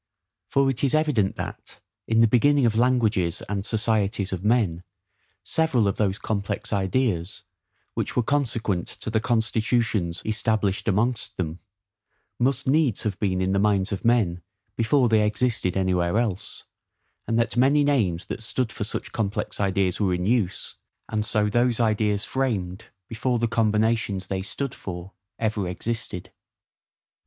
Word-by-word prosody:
For 140 0 +2
it 130 - -4
is 140 +1 +3
evident 145 -11 +1
that, - - -7 0.3
in 115 0 +3
the 115 - +6
beginning 140 +4 +4
of 110 -2 +2
languages 115 -8 +2
and 100 -1 -2
societies 105 -3 0
of 95 0 -4
men, 105 -7 +2 0.6
several 140 -10 +2
of 100 - -1
those 100 -2 +1
complex 100 0 -3
ideas, 100 -2 -1 0.5
which - - -3
were 125 - +2
consequent 115 -9 0
to 110 - -7
the 110 - +2
constitutions 110 -5 0
established 110 -2 0
amongst 110 +4 0
them, 85 -1 -3 0.8
must 130 +1 +1
needs 140 -5 +2
have 100 -4 -2
been 95 -3 0
in 95 - 0
the 100 - +2
minds 100 -1 +2
of 100 - -3
men 110 -8 +2 0.3
before 120 +3 +3
they 110 -2 +3
existed 105 -3 0
anywhere 90 0 +1
else; 105 -4 -2 0.6
and 115 - +1
that 115 0 0
many 140 +4 +4
names 105 -12 +1
that - - -6
stood 115 +1 -2
for 105 - -4
such 105 - -5
complex 105 -2 -2
ideas 95 -2 +1
were 95 -4 +2
in 90 0 -2
use, 100 -5 -1 0.3
and 110 -1 -1
so 105 0 +1
those 120 +2 +1
ideas 105 -2 +1
framed, 110 -8 -2 0.2
before 120 +2 -1
the 115 0 +1
combinations 110 -3 +1
they 95 -1 -3
stood 120 +6 -4
for 90 0 -7 0.3
ever 105 -4 -1
existed. 110 -1 -4
110 Hz, 150 wpm, -25 LUFS, 95-120 Hz, 0.8 s, the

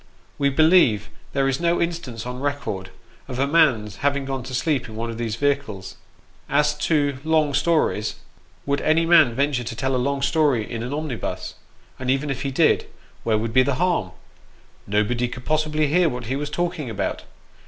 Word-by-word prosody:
We 140 -1 +3
believe 140 - +4 0.2
there 135 -1 +2
is 135 0 0
no 170 0 +1
instance 165 -10 -3
on 125 0 -5
record, 140 -9 -3 0.4
of 125 -2 -5
a 135 - +2
man's 130 - +2
having 140 +1 0
gone 135 -1 -3
to 130 - -7
sleep 135 -3 0
in 110 - -9
one 115 +1 -3
of 115 - -7
these 115 -2 -2
vehicles. 140 -8 -2 0.5
As 150 +1 +2
to 145 -4 +1
long 155 -2 +2
stories, 145 -8 +1 0.5
would 140 0 0
any 160 +2 +3
man 160 -8 +5
venture 140 -2 +1
to 115 - -5
tell 130 +2 -1
a 125 - +1
long 140 +1 -1
story 140 -6 +2
in 115 -2 -5
an 125 +3 -4
omnibus? 145 -5 -4 0.5
and 130 -1 -3
even 135 +2 +1
if 135 - -4
he 140 - -1
did, 150 +4 +2 0.4
where 110 -2 +2
would 110 +1 -3
be 130 - +6
the 140 +1 +1
harm? 170 - +1 0.8
nobody 105 +4 +1
could 125 +1 -9
possibly 155 0 +1
hear 165 +3 +3
what 125 -2 -5
he 130 +5 -2
was 145 +1 -3
talking 170 -4 -2
about. 110 - -3
140 Hz, 185 wpm, -23 LUFS, 120-150 Hz, 0.8 s, be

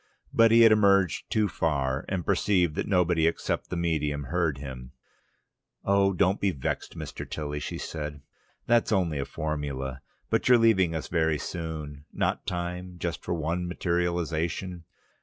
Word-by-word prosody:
But 115 0 +6
he 115 +1 +6
had 115 -1 +8
emerged 100 -5 +3
too 110 -1 +2
far, 70 -6 -1
and 95 -3 -2
perceived 90 -4 +2
that - - -3
nobody 85 -4 +3
except 80 - -2
the - - -3
medium 75 -4 -1
heard 80 0 0
him. 65 -2 -8 0.9
"Oh, 100 0 +4
don't 95 +1 +1
be 100 - +3
vexed, 70 -8 -4
Mr. - - -7
Tilly," 75 -1 -4
she - - -5
said. 75 -2 -6 0.4
"That's 120 -1 +3
only 85 -8 +1
a 70 - -1
formula. 70 -4 -4 0.3
But - - +2
you're 125 - +8
leaving 95 -8 +3
us 80 - -3
very 80 -3 +1
soon. 75 -3 -6
Not - - -1
time 90 +1 -4
for - - -14
just 85 -1 -4
one 85 +2 -1
materialisation? 85 0 -2
85 Hz, 155 wpm, -27 LUFS, 75-95 Hz, 0.9 s, had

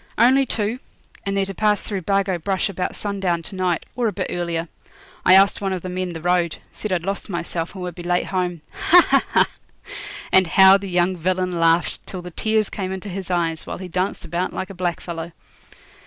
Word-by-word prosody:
'Only 260 +4 +5
two; 220 +3 -1 0.5
and 195 0 0
they're 195 - +2
to 195 - -6
pass 210 +1 +2
through 200 -3 -3
Bargo 195 -1 +1
Brush 190 +4 0
about 185 -2 -3
sundown 195 -5 -1
to 195 - -7
night, 180 -2 0
or 240 -1 +1
a - - +1
bit - - -4
earlier. 170 -1 -2 0.6
I 185 - +7
asked 195 +1 +5
one 195 -1 -1
of 185 - -4
the 185 - -4
men 180 -1 -3
the 165 - -7
road; 175 -1 +1 0.2
said 215 - -5
I'd 175 -2 0
lost 200 +2 -3
myself, 170 -1 -3
and 185 - -6
would 180 -1 -4
be 175 - -9
late 175 0 0
home. 180 -3 -2 0.3
Ha! 355 0 +8
ha! - - +4
ha!' - - +3 0.8
And 190 -1 +5
how 190 +4 +7
the 200 -1 -7
young 180 +1 +2
villain 185 +2 0
laughed 165 +1 +2
till 185 -2 -6
the 180 - -8
tears 215 +3 +1
came 190 -2 -3
into 190 +2 -5
his 185 -1 -5
eyes, 165 -3 -1
while - - -4
he 185 - -7
danced 185 +2 -2
about 175 +3 -2
like 190 - -4
a - - -8
blackfellow. 170 -2 -4
185 Hz, 215 wpm, -22 LUFS, 175-195 Hz, 0.8 s, Ha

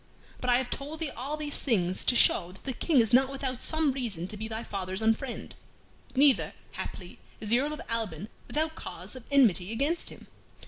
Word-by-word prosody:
But 250 - -2
I 245 - +6
have 255 -1 -3
told 290 +3 -5
thee 315 -4 -2
all 275 +6 -4
these 295 -1 0
things 185 -8 +1
to 245 - +4
show 180 -6 +5
that 190 - -14
the 265 - -3
King 290 +3 +2
is 225 -2 +2
not 260 +2 +6
without 265 -2 -3
some 315 -3 +1
reason 225 -10 -3
to - - -2
be 220 +1 -5
thy 220 +1 -4
father's 190 -2 -4
unfriend. 225 +3 -1 0.6
Neither, 275 0 +4 0.2
haply, - - -7 0.2
is 215 - -6
the 235 +2 +6
Earl 295 +3 -1
of 305 - -6
Alban 215 -6 -2 0.2
without 315 +1 0
cause - - -7
of 255 -2 -11
enmity 220 -9 +4
against 280 +9 0
him. - - -12
250 Hz, 200 wpm, -29 LUFS, 220-280 Hz, 0.6 s, I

